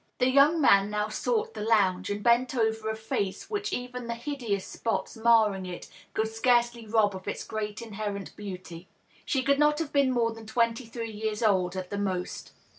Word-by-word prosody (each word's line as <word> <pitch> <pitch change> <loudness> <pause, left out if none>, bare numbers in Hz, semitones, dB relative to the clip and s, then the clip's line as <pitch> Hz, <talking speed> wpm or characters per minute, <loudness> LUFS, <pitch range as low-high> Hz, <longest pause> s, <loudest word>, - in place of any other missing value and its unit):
The 255 +1 +3
young 285 +5 +5
man 200 -8 +5
now 210 0 -1
sought 450 - -1
the - - -6
lounge, 195 -4 +2
and 205 0 -3
bent 240 +2 +3
over 220 -2 0
a 220 - -1
face 220 - -3
which 415 -1 -2
even 250 -1 -4
the 235 - -2
hideous 235 -6 -3
spots 195 -3 -3
marring 220 -4 +3
it 175 -1 -7 0.3
could 220 - +1
scarcely 235 0 +1
rob 210 -2 +2
of 185 - -9
its - - -3
great 215 0 -4
inherent 205 -3 -5
beauty. 185 -3 -8 0.4
She 265 -2 0
could 280 +1 +2
not 300 0 +4
have 320 -2 -3
been 280 -2 +4
more 230 -2 +1
than 225 -1 -11
twenty 230 +1 0
three 230 -1 -5
years 215 +1 -3
old, 190 -4 +2
at 185 -1 -5
the 200 - -2
most. 185 -3 -3
220 Hz, 190 wpm, -28 LUFS, 205-245 Hz, 0.4 s, young